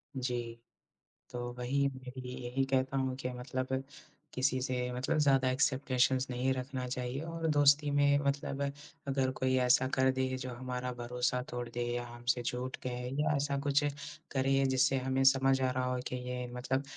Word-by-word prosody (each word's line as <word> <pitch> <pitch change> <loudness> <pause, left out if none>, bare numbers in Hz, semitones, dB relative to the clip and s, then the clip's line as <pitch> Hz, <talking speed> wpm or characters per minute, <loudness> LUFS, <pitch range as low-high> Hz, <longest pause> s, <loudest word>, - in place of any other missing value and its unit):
जी। 120 -2 -3 0.7
तो 120 -1 -4
वही 140 +3 +1
मैं 130 -1 -8
भी 125 - -6
यही 130 +2 0
कहता 135 0 +1
हूँ 130 -1 0
कि 130 -1 -3
मतलब 130 +1 -3 0.5
किसी 130 0 +1
से 130 -1 -1 0.2
मतलब 125 +5 0
ज़्यादा 135 -3 +4
एक्सपेक्टेशन्स 130 0 +2
नहीं 125 +2 +1
रखना 130 0 -4
चाहिए 125 +2 -3
और 165 0 -3
दोस्ती 145 0 +5
में 145 0 +4
मतलब 140 0 -1 0.5
अगर 135 -1 +1
कोई 130 0 +1
ऐसा 125 +1 +4
कर 130 0 +4
दे 130 0 0
जो 130 0 -5
हमारा 125 0 -4
भरोसा 125 +1 -1
तोड़ 120 -1 -4
दे 120 +1 -3
या 120 - -2
हमसे 120 +1 -1
झूठ 125 +2 -3
कहे 125 0 -3
या 150 - +2
ऐसा 140 0 0
कुछ 145 +1 +3 0.5
करे 135 0 +2
जिससे 135 +1 +3
हमें 130 +1 0
समझ 135 0 +5
आ 130 -1 +2
रहा 130 0 -1
हो 125 - -1
कि 125 - -3
ये 125 0 -3
मतलब 130 +2 -1
130 Hz, 175 wpm, -32 LUFS, 125-135 Hz, 0.7 s, दोस्ती